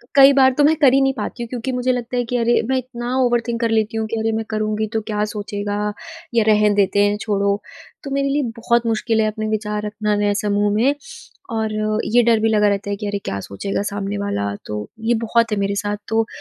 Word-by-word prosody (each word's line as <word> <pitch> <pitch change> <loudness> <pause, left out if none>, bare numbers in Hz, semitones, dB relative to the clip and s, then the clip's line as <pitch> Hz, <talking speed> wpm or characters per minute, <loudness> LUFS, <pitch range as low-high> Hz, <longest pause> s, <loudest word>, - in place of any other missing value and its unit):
कई 275 0 +9
बार 265 -1 +5
तो 295 - +4
मैं 310 +2 +5
कर 265 -2 +6
ही 275 - +5
नहीं 270 0 +2
पाती 240 0 -5
हूँ - - -6
क्योंकि 250 +1 -3
मुझे 250 0 0
लगता 245 0 -3
है 245 - +1
कि 245 - 0
अरे 235 0 +2
मैं 265 - +2
इतना 245 0 -4
ओवरथिंक 240 -1 +1
कर 230 - +1
लेती 220 0 0
हूँ 220 - -1
कि 225 - -3
अरे! 225 0 0
मैं 220 0 -2
करुँगी 215 0 -1
तो 220 - 0
क्या 210 0 0
सोचेगा 205 -1 -4 0.6
या 230 - +4
रहन 210 -1 +4
देते 200 0 +2
हैं, 205 0 +1
छोड़ो। 200 -1 0 0.4
तो 275 - -6
मेरे 275 0 0
लिए 290 0 +1
बहुत 235 +1 +1
मुश्किल 225 0 +1
है 215 - +2
अपने 215 0 -3
विचार 210 -1 -2
रखना 210 0 -1
नए 205 0 +1
समूह 205 -1 +1
में। 250 +7 +3 0.6
और 220 -1 -1 0.4
ये 245 - +6
डर 230 -1 +4
भी 225 +1 +2
लगा 210 -1 +3
रहता 200 0 -1
है 200 - -1
कि 210 0 -5
अरे! 205 0 -2
क्या 100 0 -3
सोचेगा 100 - -4
सामने 200 0 -3
वाला, 100 - -2
तो 105 0 -5
ये 225 +2 +1
बहुत 230 0 +2
है 210 - 0
मेरे 200 0 0
साथ। 205 0 -2
तो 225 0 +2
अ, - - -14
220 Hz, 240 wpm, -20 LUFS, 205-240 Hz, 0.6 s, कई